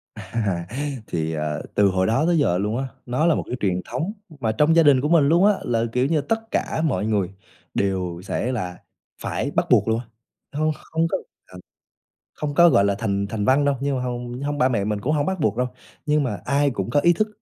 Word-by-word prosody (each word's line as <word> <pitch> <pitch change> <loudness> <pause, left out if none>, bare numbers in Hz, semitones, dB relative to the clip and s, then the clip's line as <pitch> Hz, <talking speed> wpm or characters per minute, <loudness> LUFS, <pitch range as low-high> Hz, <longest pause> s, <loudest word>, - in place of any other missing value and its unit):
À. 100 -7 -3 0.4
Thì, 80 -1 -2
ờ, 75 -1 -2
từ 105 -1 +5
hồi 95 0 +1
đó 115 +8 +2
tới 170 -1 +3
giờ 90 - +2
luôn 105 +4 -1
á, 135 +1 -2 0.2
nó 125 +6 0
là 170 -2 +4
một - - -2
cái - - -3
truyền 90 -3 0
thống 155 - -2 0.3
mà 115 -4 0
trong 150 +9 +3
gia 165 - +6
đình 140 -4 +5
của 150 - 0
mình 155 -5 +5
luôn 170 +4 +5
á 210 - +6
là, 115 -1 0
kiểu 125 +1 +2
như, 155 +1 +1
tất 225 +8 -3
cả - - -1
mọi 120 -7 0
người 105 -5 0 0.4
đều 90 -3 -1
sẽ 120 +4 -2
là 90 -8 -4 0.4
phải - - -2
bắt - - +1
buộc - - +4
luôn 110 +1 +1
á. 125 - -9 0.5
Hông, 155 0 +2 0.2
không 160 +1 +1
có - - -1 0.3
là 90 - -13 0.8
không 150 -1 -4
có, 170 +3 +7
gọi 100 -11 +4
là, 100 - +2
thành 100 0 -1
thành 105 0 -3
văn 135 +6 +4
đâu, 140 -1 +2
nhưng 140 -1 0
mà 125 - -2
hông 125 0 -4
hông 145 0 -2
ba 130 - +4
mẹ 110 -6 0
mình 105 -1 -2
cũng 140 +9 0
hông 145 -1 +1
bắt 190 -2 -2
buộc 110 -6 +1
đâu. 125 +1 +1 0.4
nhưng 150 0 +3
mà 105 -7 -2
ai 140 +2 +2
cũng 100 -4 -3
có 145 - +3
ý 175 +3 +5
thức 215 +5 0
125 Hz, 240 wpm, -23 LUFS, 100-150 Hz, 0.8 s, có